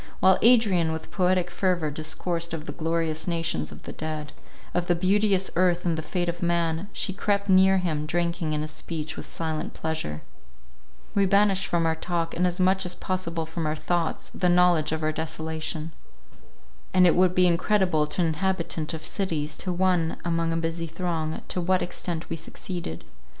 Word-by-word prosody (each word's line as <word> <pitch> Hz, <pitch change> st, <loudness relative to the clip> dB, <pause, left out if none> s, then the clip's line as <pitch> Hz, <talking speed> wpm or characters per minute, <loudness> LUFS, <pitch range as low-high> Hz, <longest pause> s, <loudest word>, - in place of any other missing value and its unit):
While 190 Hz, 0 st, +5 dB
Adrian 210 Hz, -9 st, +5 dB
with 160 Hz, 0 st, -5 dB
poetic 180 Hz, -2 st, +1 dB
fervour 175 Hz, -4 st, 0 dB
discoursed 165 Hz, +2 st, -2 dB
of 155 Hz, -1 st, -7 dB
the 145 Hz, -, -5 dB
glorious 160 Hz, 0 st, -1 dB
nations 165 Hz, -, -1 dB
of -, -, -12 dB
the -, -, -7 dB
dead, 155 Hz, -1 st, -5 dB, 0.4 s
of 175 Hz, 0 st, 0 dB
the 175 Hz, -, +3 dB
beauteous 195 Hz, +1 st, +2 dB
earth 180 Hz, 0 st, +2 dB
and 170 Hz, -2 st, +2 dB
the 160 Hz, -, -3 dB
fate 175 Hz, +2 st, -2 dB
of 175 Hz, 0 st, -3 dB
man, 170 Hz, +1 st, 0 dB
she 190 Hz, -, -2 dB
crept 200 Hz, +1 st, 0 dB
near 190 Hz, 0 st, +6 dB
him, 155 Hz, -5 st, -1 dB
drinking 170 Hz, -1 st, -1 dB
in 150 Hz, 0 st, -1 dB
his 155 Hz, -, -5 dB
speech 160 Hz, -2 st, -5 dB
with -, -, -8 dB
silent 160 Hz, -2 st, -3 dB
pleasure. 160 Hz, -, -3 dB, 0.9 s
We 200 Hz, -1 st, +3 dB
banished 200 Hz, 0 st, +3 dB
from 170 Hz, -1 st, +1 dB
our 160 Hz, -, +3 dB
talk, 165 Hz, 0 st, -2 dB
and 180 Hz, +2 st, +2 dB
as 180 Hz, 0 st, -2 dB
much 190 Hz, +1 st, +3 dB
as 180 Hz, -, -3 dB
possible 170 Hz, -3 st, -2 dB
from 160 Hz, 0 st, -3 dB
our 155 Hz, -, 0 dB
thoughts, 165 Hz, +2 st, -2 dB
the 180 Hz, -, +1 dB
knowledge 175 Hz, -3 st, +4 dB
of 160 Hz, 0 st, -2 dB
our 155 Hz, -, +2 dB
desolation. 160 Hz, 0 st, -3 dB, 1.0 s
And 185 Hz, 0 st, +7 dB
it 175 Hz, -, +5 dB
would 180 Hz, 0 st, +3 dB
be 185 Hz, -, +5 dB
incredible 175 Hz, -3 st, +2 dB
to 180 Hz, -, -1 dB
an 170 Hz, -, +3 dB
inhabitant 165 Hz, -2 st, -1 dB
of 155 Hz, 0 st, -8 dB
cities, 155 Hz, -6 st, -2 dB
to 185 Hz, -, -2 dB
one 175 Hz, -2 st, +1 dB
among 165 Hz, -1 st, 0 dB
a 165 Hz, -, 0 dB
busy 165 Hz, 0 st, -2 dB
throng, 165 Hz, -1 st, -3 dB
to 180 Hz, -, 0 dB
what 185 Hz, +1 st, +2 dB
extent 175 Hz, -2 st, -4 dB
we -, -, -3 dB
succeeded. 165 Hz, -, -6 dB
170 Hz, 185 wpm, -26 LUFS, 160-185 Hz, 1.0 s, And